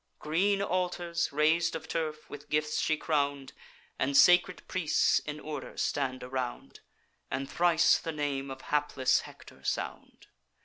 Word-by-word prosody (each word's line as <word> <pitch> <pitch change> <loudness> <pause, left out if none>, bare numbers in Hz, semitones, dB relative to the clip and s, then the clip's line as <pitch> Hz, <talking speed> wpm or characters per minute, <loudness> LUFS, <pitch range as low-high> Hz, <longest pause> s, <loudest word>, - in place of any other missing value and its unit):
Green 195 +6 +1
altars, 175 -3 -1
rais'd 155 +3 +2
of 160 0 -6
turf, 155 -2 -3
with 145 0 -10
gifts 150 0 0
she 155 - +1
crown'd, 140 -3 -1 0.5
And 135 +1 +2
sacred 180 +3 +5
priests 170 -5 +2
in 150 0 -6
order 150 -3 -7
stand 130 -3 -1
around, 125 -1 -5 0.5
And 135 +1 -3
thrice 170 +2 +3
the 165 - -4
name 145 -3 -2
of 130 0 -7
hapless 145 -3 +1
Hector - - -13
sound. - - -4
150 Hz, 135 wpm, -30 LUFS, 140-170 Hz, 0.5 s, sacred